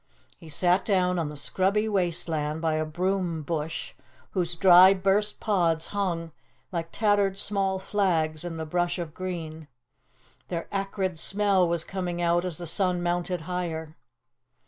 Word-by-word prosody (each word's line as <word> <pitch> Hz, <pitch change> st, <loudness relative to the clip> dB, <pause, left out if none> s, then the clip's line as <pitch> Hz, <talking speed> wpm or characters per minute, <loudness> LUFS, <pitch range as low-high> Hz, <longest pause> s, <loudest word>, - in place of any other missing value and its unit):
He 165 Hz, -, -12 dB
sat 180 Hz, +4 st, +2 dB
down 180 Hz, -3 st, +1 dB
on 160 Hz, -3 st, -2 dB
the 150 Hz, -, -8 dB
scrubby 195 Hz, +8 st, +1 dB
waste 180 Hz, -6 st, 0 dB
land 155 Hz, -1 st, -2 dB
by 160 Hz, -1 st, 0 dB
a 155 Hz, 0 st, 0 dB
broom 175 Hz, 0 st, -1 dB
bush, 150 Hz, -4 st, -4 dB, 0.4 s
whose 175 Hz, -2 st, -1 dB
dry, 185 Hz, +2 st, +7 dB
burst 200 Hz, +2 st, +1 dB
pods 170 Hz, -6 st, +1 dB
hung 170 Hz, -5 st, -2 dB, 0.4 s
like 170 Hz, -2 st, -4 dB
tattered 205 Hz, -3 st, +2 dB
black 195 Hz, -2 st, 0 dB
flags 165 Hz, -6 st, 0 dB
in 170 Hz, -2 st, -5 dB
the 160 Hz, -, -4 dB
brush 175 Hz, +2 st, -1 dB
of 170 Hz, -4 st, -5 dB
green; 165 Hz, -4 st, -6 dB, 0.8 s
their 170 Hz, -2 st, -4 dB
acrid 195 Hz, -3 st, -2 dB
smell 195 Hz, -2 st, +3 dB
was 170 Hz, -1 st, +1 dB
coming 180 Hz, -2 st, -4 dB
out 175 Hz, +1 st, +2 dB
as 175 Hz, -4 st, -3 dB
the 175 Hz, -, -7 dB
sun 180 Hz, +1 st, 0 dB
mounted 175 Hz, 0 st, -1 dB
higher. 160 Hz, -2 st, -4 dB
175 Hz, 150 wpm, -26 LUFS, 165-190 Hz, 0.8 s, dry